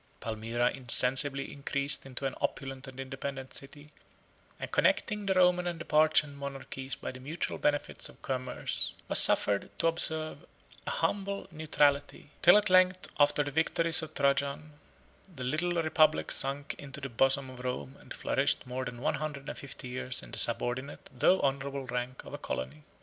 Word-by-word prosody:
Palmyra 115 Hz, +2 st, -1 dB
insensibly 135 Hz, +2 st, +2 dB
increased 140 Hz, 0 st, 0 dB
into 135 Hz, +1 st, -4 dB
an 135 Hz, -, -1 dB
opulent 135 Hz, -1 st, -3 dB
and 130 Hz, 0 st, -10 dB
independent 135 Hz, 0 st, -6 dB
city, 145 Hz, +2 st, -7 dB, 0.7 s
and -, -, -6 dB
connecting 210 Hz, -2 st, +1 dB
the 190 Hz, -, +2 dB
Roman 180 Hz, -1 st, +4 dB
and 170 Hz, -2 st, -3 dB
the -, -, -7 dB
Parthian 155 Hz, -1 st, +4 dB
monarchies 135 Hz, -1 st, -6 dB
by -, -, -6 dB
the 130 Hz, -, -11 dB
mutual 150 Hz, +6 st, -4 dB
benefits 145 Hz, -1 st, -1 dB
of -, -, -17 dB
commerce, 130 Hz, -1 st, -1 dB
was -, -, +4 dB
suffered 100 Hz, -1 st, +4 dB
to -, -, -1 dB
observe 160 Hz, -1 st, +2 dB
an -, -, -21 dB, 0.4 s
humble 200 Hz, -, -1 dB
neutrality, 145 Hz, -2 st, +1 dB
till 175 Hz, +4 st, +8 dB
at 210 Hz, -2 st, +2 dB
length, 185 Hz, 0 st, +4 dB
after 145 Hz, 0 st, +4 dB
the 145 Hz, -, -5 dB
victories 165 Hz, +2 st, +2 dB
of 160 Hz, -, -8 dB
Trajan, 140 Hz, +2 st, 0 dB, 0.6 s
the 130 Hz, -, -6 dB
little 155 Hz, +7 st, 0 dB
republic 155 Hz, -1 st, +3 dB
sunk 140 Hz, +1 st, -1 dB
into 140 Hz, -2 st, -8 dB
the 135 Hz, -, -4 dB
bosom 135 Hz, +2 st, +1 dB
of 125 Hz, -1 st, -10 dB
Rome, 70 Hz, -, -4 dB
and -, -, -18 dB
flourished -, -, 0 dB
more 130 Hz, +1 st, -4 dB
than 125 Hz, -1 st, -7 dB
one -, -, +1 dB
hundred 145 Hz, -2 st, -5 dB
and -, -, -5 dB
fifty 135 Hz, -2 st, -8 dB
years 125 Hz, 0 st, -4 dB
in -, -, -12 dB
the -, -, -1 dB
subordinate 130 Hz, +10 st, 0 dB
though 190 Hz, -, +4 dB
honorable 140 Hz, 0 st, -1 dB
rank 125 Hz, +1 st, -4 dB
of -, -, -10 dB
a -, -, -5 dB
colony. 65 Hz, +4 st, -5 dB
140 Hz, 170 wpm, -30 LUFS, 130-155 Hz, 0.7 s, till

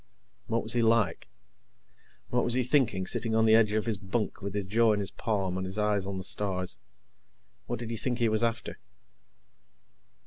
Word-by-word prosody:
What 115 Hz, 0 st, 0 dB
was 110 Hz, -, -1 dB
he 120 Hz, -, +2 dB
like? 115 Hz, -7 st, +2 dB, 1.0 s
What 120 Hz, -, +2 dB
was 120 Hz, -, +1 dB
he 130 Hz, -, +2 dB
thinking, 120 Hz, -8 st, +2 dB
sitting 110 Hz, +4 st, -1 dB
on 110 Hz, 0 st, +4 dB
the 110 Hz, -, +5 dB
edge 110 Hz, -2 st, +5 dB
of 110 Hz, 0 st, 0 dB
his 110 Hz, -4 st, -2 dB
bunk 105 Hz, +3 st, -3 dB
with 100 Hz, 0 st, -5 dB
his 100 Hz, -2 st, -1 dB
jaw 110 Hz, +3 st, +3 dB
in 105 Hz, -, 0 dB
his 100 Hz, -, -3 dB
palm 100 Hz, -5 st, -1 dB
and 95 Hz, -, -3 dB
his 95 Hz, +2 st, -6 dB
eyes 105 Hz, -2 st, +1 dB
on 100 Hz, -1 st, -3 dB
the 95 Hz, -, -5 dB
stars? 95 Hz, -2 st, -2 dB, 0.9 s
What -, -, -2 dB
did 115 Hz, 0 st, -6 dB
he 115 Hz, -, -3 dB
think 125 Hz, +2 st, -1 dB
he 120 Hz, -2 st, +2 dB
was 110 Hz, +1 st, +1 dB
after? 115 Hz, 0 st, -2 dB
110 Hz, 200 wpm, -29 LUFS, 100-115 Hz, 1.0 s, the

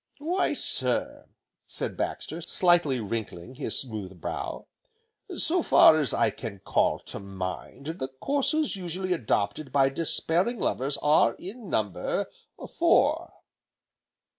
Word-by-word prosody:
"Why 340 Hz, +6 st, 0 dB
sir," -, -, 0 dB, 0.5 s
began -, -, -3 dB
Baxter, 165 Hz, +2 st, -3 dB
slightly 175 Hz, -6 st, +2 dB
wrinkling 110 Hz, -1 st, -5 dB
his 135 Hz, +2 st, 0 dB
smooth 105 Hz, -8 st, -4 dB
brow, -, -, -5 dB, 0.7 s
"so 350 Hz, +2 st, +3 dB
far 155 Hz, -, +7 dB
as 145 Hz, -, +1 dB
I -, -, +2 dB
can 110 Hz, -4 st, -7 dB
call 95 Hz, -, +1 dB
to -, -, -7 dB
mind, 95 Hz, +7 st, -6 dB
the 160 Hz, -4 st, -4 dB
courses 280 Hz, -, -1 dB
usually 185 Hz, 0 st, -2 dB
adopted 120 Hz, -, -1 dB
by 135 Hz, -1 st, +4 dB
despairing 170 Hz, -, +1 dB
lovers, 140 Hz, -2 st, 0 dB
are, 150 Hz, -6 st, +4 dB
in 210 Hz, +2 st, -9 dB
number, 105 Hz, -, -1 dB, 0.5 s
four." -, -, +3 dB
145 Hz, 115 wpm, -27 LUFS, 110-185 Hz, 0.7 s, far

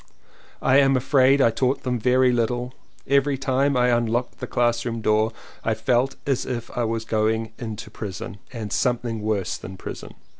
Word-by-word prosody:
I 130 Hz, -, +5 dB
am 135 Hz, -1 st, +4 dB
afraid 135 Hz, +1 st, +4 dB
I 115 Hz, -, +5 dB
taught 130 Hz, +4 st, 0 dB
them 125 Hz, -2 st, -1 dB
very 125 Hz, +2 st, +4 dB
little, 120 Hz, +1 st, -1 dB, 0.3 s
every 140 Hz, 0 st, +2 dB
time 135 Hz, +1 st, +1 dB
I 125 Hz, 0 st, +3 dB
unlocked 120 Hz, +1 st, 0 dB
the -, -, -5 dB
classroom 120 Hz, -1 st, 0 dB
door 110 Hz, 0 st, +2 dB, 0.3 s
I 110 Hz, -, +1 dB
felt 120 Hz, +4 st, +1 dB
as 135 Hz, -3 st, 0 dB
if 120 Hz, -2 st, -5 dB
I 120 Hz, -, 0 dB
was 115 Hz, 0 st, -2 dB
going 110 Hz, 0 st, 0 dB
into 110 Hz, -3 st, -6 dB
prison 100 Hz, -1 st, -6 dB
and 110 Hz, -5 st, -5 dB
something 120 Hz, -3 st, 0 dB
worse 100 Hz, -4 st, -1 dB
than 95 Hz, 0 st, -9 dB
prison. -, -, -8 dB
120 Hz, 165 wpm, -23 LUFS, 110-130 Hz, 0.3 s, I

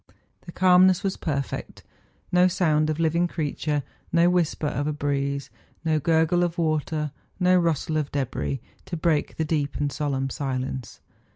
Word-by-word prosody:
The -, -, -6 dB
calmness 185 Hz, 0 st, +5 dB
was 195 Hz, -1 st, 0 dB
perfect; 140 Hz, -4 st, -4 dB, 0.5 s
no 180 Hz, +1 st, +5 dB
sound 155 Hz, -4 st, +2 dB
of 155 Hz, +1 st, -1 dB
living 165 Hz, +2 st, +2 dB
creature, 150 Hz, -2 st, -2 dB, 0.3 s
no 170 Hz, +1 st, +4 dB
whisper 175 Hz, -3 st, 0 dB
of 145 Hz, 0 st, -1 dB
a 150 Hz, -, 0 dB
breeze, 140 Hz, -1 st, -2 dB, 0.3 s
no 155 Hz, -1 st, +2 dB
gurgle 165 Hz, +2 st, +3 dB
of 175 Hz, 0 st, -1 dB
water, 155 Hz, -2 st, 0 dB, 0.3 s
no 180 Hz, 0 st, +4 dB
rustle 165 Hz, -3 st, +1 dB
of 150 Hz, -2 st, -2 dB
debris, 135 Hz, -1 st, -2 dB, 0.2 s
to 170 Hz, -, -4 dB
break 155 Hz, -2 st, 0 dB
the 160 Hz, -, 0 dB
deep 145 Hz, -3 st, -1 dB
and 145 Hz, -1 st, -1 dB
solemn 135 Hz, -2 st, -2 dB
silence. 130 Hz, -2 st, -4 dB
155 Hz, 155 wpm, -25 LUFS, 145-170 Hz, 0.5 s, calmness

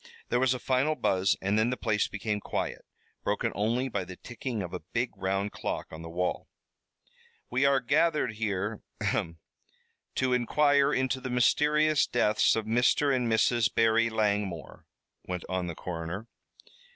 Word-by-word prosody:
There 120 Hz, -, +2 dB
was 130 Hz, 0 st, +3 dB
a -, -, -3 dB
final 130 Hz, +5 st, +1 dB
buzz 95 Hz, -7 st, +1 dB
and 100 Hz, +3 st, +2 dB
then 110 Hz, +2 st, +2 dB
the 125 Hz, -, -2 dB
place 110 Hz, -3 st, +1 dB
became 105 Hz, +1 st, -3 dB
quiet, -, -, -4 dB, 0.4 s
broken -, -, 0 dB
only 115 Hz, +6 st, 0 dB
by 100 Hz, -6 st, -2 dB
the 90 Hz, +1 st, -9 dB
ticking 120 Hz, 0 st, -5 dB
of 90 Hz, 0 st, -7 dB
a 90 Hz, -, -3 dB
big 120 Hz, +5 st, -2 dB
round 95 Hz, +2 st, -1 dB
clock -, -, -4 dB
on 80 Hz, -, -8 dB
the 85 Hz, -, -8 dB
wall. 90 Hz, +2 st, -2 dB, 1.0 s
"We 130 Hz, +3 st, +2 dB
are 140 Hz, -1 st, +4 dB
gathered 150 Hz, +1 st, +2 dB
here 105 Hz, 0 st, -2 dB, 0.2 s
ahem! 85 Hz, 0 st, -1 dB, 0.8 s
to 130 Hz, -1 st, +1 dB
inquire 140 Hz, +3 st, +3 dB
into 130 Hz, 0 st, 0 dB
the 130 Hz, -, -4 dB
mysterious 150 Hz, +5 st, +3 dB
deaths 110 Hz, -3 st, +3 dB
of 110 Hz, -1 st, -2 dB
Mr. 120 Hz, +5 st, +3 dB
and 120 Hz, -3 st, 0 dB
Mrs. 110 Hz, 0 st, +3 dB
Barry 115 Hz, 0 st, +3 dB
Langmore," 100 Hz, -7 st, -2 dB, 0.4 s
went 90 Hz, -1 st, -4 dB
on 95 Hz, -1 st, -2 dB
the 85 Hz, -, -5 dB
coroner. 85 Hz, +5 st, -5 dB
115 Hz, 160 wpm, -29 LUFS, 95-130 Hz, 1.0 s, are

